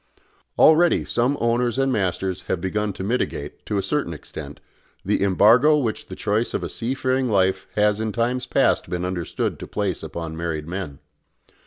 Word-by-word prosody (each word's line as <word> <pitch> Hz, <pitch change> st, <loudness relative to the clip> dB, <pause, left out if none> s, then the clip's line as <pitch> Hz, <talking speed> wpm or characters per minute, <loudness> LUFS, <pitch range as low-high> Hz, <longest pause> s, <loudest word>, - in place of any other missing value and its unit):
Already 165 Hz, +2 st, +5 dB
some 125 Hz, +4 st, +1 dB
owners 120 Hz, +1 st, +1 dB
and 135 Hz, -1 st, +2 dB
masters 95 Hz, -2 st, -1 dB
have 90 Hz, -, -1 dB
begun 105 Hz, +3 st, -1 dB
to 95 Hz, -, -6 dB
mitigate, 100 Hz, -, -3 dB
to 105 Hz, -, -1 dB
a 100 Hz, -, 0 dB
certain 100 Hz, -, -1 dB
extent, -, -, -9 dB, 0.5 s
the -, -, +1 dB
embargo 115 Hz, +10 st, +5 dB
which 115 Hz, -7 st, -2 dB
the -, -, -7 dB
choice 110 Hz, +3 st, -1 dB
of -, -, -2 dB
a -, -, -3 dB
sea 120 Hz, +3 st, -3 dB
faring 130 Hz, -1 st, 0 dB
life 95 Hz, -3 st, +1 dB
has 105 Hz, 0 st, +2 dB
in 110 Hz, 0 st, -1 dB
times 125 Hz, +3 st, -1 dB
past -, -, +2 dB
been 90 Hz, 0 st, -2 dB
understood 90 Hz, -3 st, -3 dB
to -, -, -7 dB
place 100 Hz, -4 st, -2 dB
upon 80 Hz, 0 st, -6 dB
married 80 Hz, -2 st, -3 dB
men. 85 Hz, -5 st, -5 dB
105 Hz, 175 wpm, -23 LUFS, 90-125 Hz, 0.5 s, Already